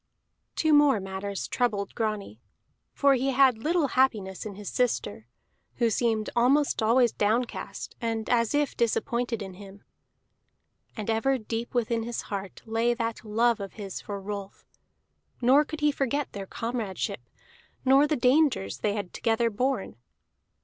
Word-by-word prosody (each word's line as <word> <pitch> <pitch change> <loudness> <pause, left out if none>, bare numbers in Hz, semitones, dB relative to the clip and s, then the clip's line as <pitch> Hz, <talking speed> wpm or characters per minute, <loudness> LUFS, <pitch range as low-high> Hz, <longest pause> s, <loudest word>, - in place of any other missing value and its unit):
Two 315 -1 +2
more 290 -6 +5
matters 195 +1 -4
troubled 210 -5 -1
Grani. 210 - -3 0.5
For 280 -1 +4
he 265 +1 +1
had 260 -3 +4
little 315 +2 +1
happiness 215 -8 +1
in 200 - -8
his 205 0 -9
sister, 120 - -1 0.5
who 235 -2 +1
seemed 220 -1 0
almost 270 +4 +3
always 235 +2 +4
downcast, 225 +4 -2
and 225 -2 -2
as 230 +1 +2
if 290 -2 +1
disappointed 235 -1 0
in 190 -1 -8
him. 200 +1 -13 1.1
And 215 - -4
ever 230 +5 +2
deep 230 +1 -5
within 230 -1 +1
his 235 +1 -4
heart 195 -1 -5
lay 230 +2 +1
that 230 -1 -3
love 230 +2 +2
of 195 -1 -6
his 200 -3 -6
for 200 -2 -5
Rolf, 200 0 -7 0.7
nor 260 +4 +5
could 310 0 -7
he 295 0 +4
forget 280 0 -1
their 195 -1 -6
comradeship, 230 -4 -3 0.6
nor 270 +3 +6
the 305 - +1
dangers 250 - +2
they 210 - 0
had 200 -4 -5
together 230 0 +1
borne. 250 - -1
230 Hz, 145 wpm, -27 LUFS, 205-255 Hz, 1.1 s, nor